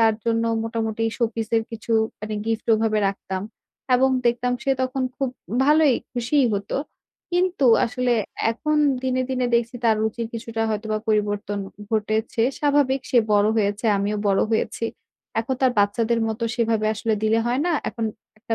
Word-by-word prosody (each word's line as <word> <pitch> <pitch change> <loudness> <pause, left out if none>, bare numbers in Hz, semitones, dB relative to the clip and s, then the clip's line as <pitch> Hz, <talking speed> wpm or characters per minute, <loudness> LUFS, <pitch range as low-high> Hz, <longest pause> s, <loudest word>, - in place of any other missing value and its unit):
তার 225 -1 +5
জন্য 230 0 +1 0.2
মোটামুটি 225 -1 -2
showpiece 225 -2 -2
এর 225 - +2
কিছু 230 0 -5 0.3
মানে 215 0 -4
gift 225 -1 -2
ওভাবে 215 -1 +1
রাখতাম 190 -1 -4 0.5
এবং 260 +2 +4 0.2
দেখতাম 245 +1 +1
সে 275 - 0
তখন 260 +1 -1
খুব 270 - -1 0.4
ভালোই 300 -2 +5 0.2
খুশিই 250 +3 +2
হতো। 200 0 -3 0.6
কিন্তু 355 -6 +2 0.2
আসলে 245 +1 0 0.4
এখন 300 +7 -1 0.3
দিনে, 255 0 0
দিনে 255 -1 0
দেখছি 235 +1 +1
তার 225 -2 +4
রুচির 225 +1 -2
কিছুটা 225 0 -3
হয়তোবা 215 0 -2
পরিবর্তন 205 -1 0 0.3
ঘটেছে। 220 +2 0 0.2
স্বাভাবিক 285 -2 +2
সে 245 - +5
বড় 205 0 +4
হয়েছে, 205 +1 0
আমিও 205 +2 -1
বড় 195 - +3
হয়েছি, 225 +1 -1 0.6
এখন 230 +4 -2
তো - - -8
আর - - -2
বাচ্চাদের 225 +3 +1
মত 220 +1 -4 0.2
সেভাবে 225 -2 +1
আসলে 220 +1 0
দিলে 220 +1 +3
হয় 245 +3 +1
না। 350 - +2 0.2
এখন 230 -1 -4 0.3
একটা 225 +1 -3
230 Hz, 160 wpm, -23 LUFS, 215-250 Hz, 0.6 s, তার